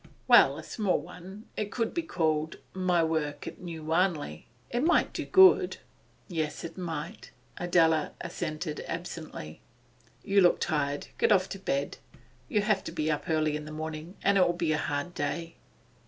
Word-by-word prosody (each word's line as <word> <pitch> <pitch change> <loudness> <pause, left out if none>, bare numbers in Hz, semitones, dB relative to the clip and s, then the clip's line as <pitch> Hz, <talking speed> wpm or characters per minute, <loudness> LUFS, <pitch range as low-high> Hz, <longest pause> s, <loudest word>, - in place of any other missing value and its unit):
'Well, - - +7
a - - -7
small 205 -5 0
one. 190 +4 -11
It 210 -1 -3
could 230 0 -1
be 340 - 0
called, 160 - -1 0.2
"My 180 -2 +2
Work 150 -3 -1
at - - -8
New 165 -3 -7
Wanley." 160 - 0 0.2
It 240 - 0
might 330 +5 +3
do - - -3
good.' 380 0 +6 0.5
'Yes, 160 -4 -3
it 165 -1 -6
might,' 165 -3 -5 0.3
Adela 165 -3 +2
assented 155 -2 -4
absently. 165 - -6 0.6
'You 200 0 +4
look 175 - +5
tired. 145 -2 -1
Get - - +3
off 190 -2 +4
to 195 - -6
bed; 140 -7 -2 0.5
you'll 210 -4 +1
have 210 -3 +1
to - - -4
be 155 -2 -1
up 150 - -3
early 155 -1 +1
in 150 0 -5
the 155 - -8
morning, 155 +3 -6
and 200 0 +4
it'll 175 -1 +4
be 170 -2 0
a 150 - +1
hard 145 +5 -2
day. 165 +3 -3
165 Hz, 170 wpm, -29 LUFS, 155-185 Hz, 0.6 s, Well